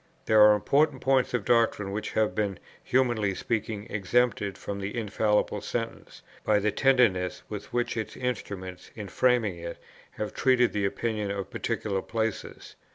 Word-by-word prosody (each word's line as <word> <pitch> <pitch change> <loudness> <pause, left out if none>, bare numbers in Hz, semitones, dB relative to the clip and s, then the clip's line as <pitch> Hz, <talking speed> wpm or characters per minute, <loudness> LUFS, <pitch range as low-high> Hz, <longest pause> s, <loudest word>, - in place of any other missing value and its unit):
There 110 -1 +5
are 105 0 +8
important 140 +5 +2
points 130 0 +2
of 115 - -2
doctrine 115 -4 +2
which 105 +1 -4
have 110 -1 +1
been 100 -3 -1 0.3
(humanly 120 -6 +1
speaking) 110 -1 -3
exempted 105 -1 0
from 100 0 -5
the 100 +4 -4
infallible 105 -1 0
sentence, 115 -1 -5 0.2
by 105 - +3
the 105 +1 +1
tenderness 110 -10 +2
with 105 -1 -7
which 120 0 -1
its 110 -2 -4
instruments, 100 -7 -5
in 105 -3 -6
framing 115 -6 +1
it, 85 0 -6 0.4
have 105 - -4
treated 125 -2 +3
the 105 -1 0
opinions 105 -1 -2
of 100 - -5
particular 100 -3 -2
places. 110 0 -4
105 Hz, 155 wpm, -27 LUFS, 100-120 Hz, 0.4 s, are